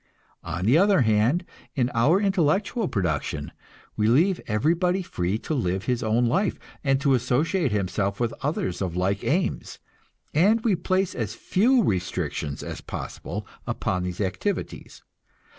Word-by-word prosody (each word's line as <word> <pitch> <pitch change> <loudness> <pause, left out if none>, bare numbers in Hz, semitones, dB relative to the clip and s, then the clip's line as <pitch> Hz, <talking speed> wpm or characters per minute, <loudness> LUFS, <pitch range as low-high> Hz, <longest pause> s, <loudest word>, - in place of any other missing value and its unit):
On 90 +2 -3
the 130 +9 +5
other 200 -4 +4
hand, 115 +9 +2 0.3
in 125 -3 +1
our 135 +11 +4
intellectual 195 - +1
production 85 - -2 0.4
we 105 0 +1
leave 170 - +3
everybody 170 - +1
free 90 - -2
to 155 - -4
live 95 -8 -1
his 125 -2 0
own 115 +2 +2
life, 185 - +1 0.3
and 135 -2 +2
to 140 -2 +3
associate 145 - +1
himself 100 0 -1
with 120 -2 0
others 135 - -2
of 90 -3 -2
like 95 +2 0
aims, 175 +5 -1 0.6
and 205 +9 +4
we 215 -5 +3
place 185 +2 0
as 110 -3 -3
few 235 - +3
restrictions 90 - -2
as - - -6
possible - - -6 0.2
upon 90 0 -1
their 90 +3 -2
activities. 200 - -4
125 Hz, 140 wpm, -25 LUFS, -, 0.6 s, the